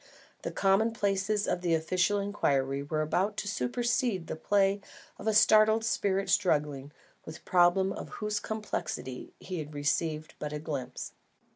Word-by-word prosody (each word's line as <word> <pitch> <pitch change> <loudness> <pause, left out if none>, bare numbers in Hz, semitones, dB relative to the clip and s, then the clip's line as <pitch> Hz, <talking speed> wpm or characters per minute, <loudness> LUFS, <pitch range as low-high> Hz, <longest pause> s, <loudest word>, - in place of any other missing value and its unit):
The - - -3
commonplaces 200 0 +1
of 180 - -1
an 170 -2 +2
official 180 +5 +1
inquiry 140 -9 0
were 155 +2 -1
about 190 +7 0
to - - -3
supersede 210 - 0
the - - -5
play 200 +3 +2 0.4
of 210 - -6
a 220 - +3
startled 215 +1 +5
spirit 195 -3 0
struggling 145 -5 +1 0.3
with 160 - -8
a - - -22
problem 180 +2 +3
of - - -7
whose 210 -1 -1
complexities 175 -12 -4
he 185 -2 -5
had 150 -1 -7
received 155 +2 -1
but 150 0 -4
a - - -2
glimpse. 145 -5 -5
185 Hz, 150 wpm, -30 LUFS, 155-205 Hz, 0.4 s, startled